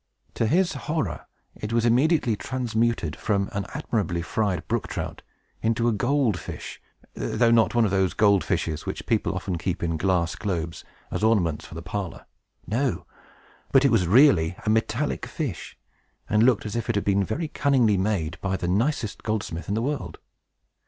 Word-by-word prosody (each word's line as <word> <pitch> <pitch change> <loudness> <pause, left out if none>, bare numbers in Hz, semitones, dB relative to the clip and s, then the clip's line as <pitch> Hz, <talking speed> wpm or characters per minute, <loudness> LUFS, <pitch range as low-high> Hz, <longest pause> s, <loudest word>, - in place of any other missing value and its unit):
To 115 - 0
his 180 - +2 0.2
horror, 145 - -2 0.3
it 105 - -6
was 115 0 +2
immediately 125 0 +3
transmuted 115 -8 -1
from 100 -2 0
an 100 -1 -3
admirably 100 - -1
fried 95 -3 -1
brook - - -1
trout - - -5 0.4
into 115 +1 +1
a - - +4
gold 120 -3 +1
fish, - - -8 0.3
though 120 -1 +1
not 115 0 +4
one 120 -1 +4
of 100 - 0
those 95 -2 +1
gold 100 -3 +4
fishes 80 -2 -2
which - - -4
people - - 0
often 90 -3 -3
keep 90 +1 -2
in 85 -1 0
glass 85 -1 +1
globes, 85 -5 -3 0.3
as - - -2
ornaments 95 -9 +2
for - - -11
the 85 - -6
parlor. 95 +1 -5 0.4
No; 125 +4 -1 0.7
but 135 0 +5
it 140 - +4
was 100 -6 +3
really 95 - +5
a 105 - +3
metallic 115 +6 0
fish, 135 - -5 0.5
and 105 0 +2
looked 120 -2 +3
as 105 - -4
if 115 0 -3
it 115 - +1
had 100 - 0
been 100 0 +3
very 145 - -2
cunningly 130 -8 +2
made 95 -4 -1
by 95 -1 -1
the 85 - -3
nicest 110 - 0
goldsmith 105 -6 -3
in 100 - 0
the 115 - 0
world. 120 - -3
105 Hz, 175 wpm, -25 LUFS, 90-120 Hz, 0.7 s, but